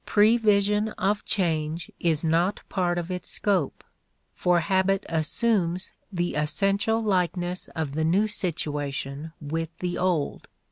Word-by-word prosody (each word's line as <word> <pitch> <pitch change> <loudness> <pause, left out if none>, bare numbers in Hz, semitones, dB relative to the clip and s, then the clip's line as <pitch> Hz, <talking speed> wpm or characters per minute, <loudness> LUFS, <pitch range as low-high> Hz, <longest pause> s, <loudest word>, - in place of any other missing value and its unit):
Prevision 210 -1 +3
of 200 +2 0
change 160 -3 -1
is 165 -2 +1
not 170 +4 +1
part 175 -2 0
of 175 +1 -3
its 180 -1 -3
scope, 190 -9 0 0.5
for 175 -1 +2
habit 190 +2 +1
assumes 180 +2 +1 0.2
the 175 -2 -1
essential 195 +9 +1
likeness 180 -2 0
of 155 -4 -2
the 160 +2 0
new 180 +7 +3
situation 150 -6 -3
with 160 +2 -3
the 180 -1 -3
old. 180 -6 0
175 Hz, 125 wpm, -26 LUFS, 160-195 Hz, 0.5 s, Prevision